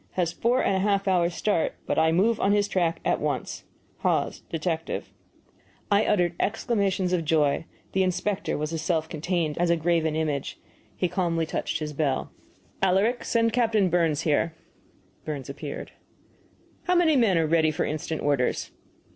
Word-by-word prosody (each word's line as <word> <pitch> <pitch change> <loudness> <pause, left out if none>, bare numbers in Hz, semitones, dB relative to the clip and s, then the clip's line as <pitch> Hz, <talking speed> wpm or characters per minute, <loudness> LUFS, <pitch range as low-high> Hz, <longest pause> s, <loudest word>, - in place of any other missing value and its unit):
Has 175 -3 0
four 245 +3 +1
and 195 - +2
a - - +1
half 200 0 +1
hours' 175 -2 +2
start, 205 -6 0
but - - 0
I 160 0 +4
move 210 +7 +2
on 200 - +3
his 205 -1 +2
track 175 -4 0
at - - +2
once. - - -3 0.3
HAWES, - - 0
Detective 165 0 -3 0.8
I 205 +1 +4
uttered 175 -4 +2
exclamations 200 -4 0
of 175 -2 +1
joy. 155 -1 +2 0.3
The 190 - +1
inspector 185 +2 -1
was 150 +2 -3
as 160 - -2
self 160 -1 0
contained 160 -1 -2
as 175 0 +2
a 170 - +3
graven 160 -1 +1
image. 150 -3 -2 0.4
He 180 - 0
calmly 170 -2 0
touched - - -2
his 150 -1 -5
bell. 140 -3 -1 0.5
"Alaric, 195 +6 +2
send 230 -1 +1
Captain 220 -5 +2
Burns 165 -4 +2
here." 160 +1 +1 0.7
Burns 140 -4 -5
appeared. 145 0 -7 0.9
"How 360 - +2
many 335 -3 +4
men 225 -9 +4
are 165 - +2
ready 160 0 +3
for 155 - -1
instant 155 +1 -3
orders?" 140 -4 0
170 Hz, 165 wpm, -26 LUFS, 160-200 Hz, 0.9 s, I